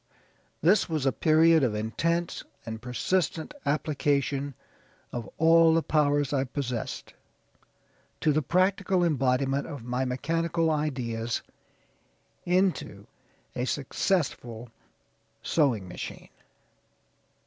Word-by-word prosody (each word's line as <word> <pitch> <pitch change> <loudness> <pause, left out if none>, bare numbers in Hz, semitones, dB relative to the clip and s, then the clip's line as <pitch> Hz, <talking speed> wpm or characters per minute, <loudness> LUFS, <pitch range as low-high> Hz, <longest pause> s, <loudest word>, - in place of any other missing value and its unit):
"This 185 +5 +4
was 155 -4 -1
a 135 - +4
period 160 +4 +4
of 120 -5 +1
intense 170 +11 -1 0.2
and 110 -1 -6
persistent 160 - -1
application, 145 -2 0 0.6
of 120 -2 -5
all 165 0 +6
the 165 - +2
powers 145 -2 +2
I 135 -2 +2
possessed, 125 -3 -4 1.1
to 155 - +2
the 155 - +2
practical 185 +4 +2
embodiment 135 -3 +1
of 145 -7 -7
my 125 +2 -1
mechanical 165 +5 0
ideas 125 -7 -2 1.0
into 185 +1 0 0.5
a 125 - -1
successful 130 - -1 0.7
sewing 125 - +1
machine. 90 - -8
145 Hz, 95 wpm, -27 LUFS, 125-165 Hz, 1.1 s, all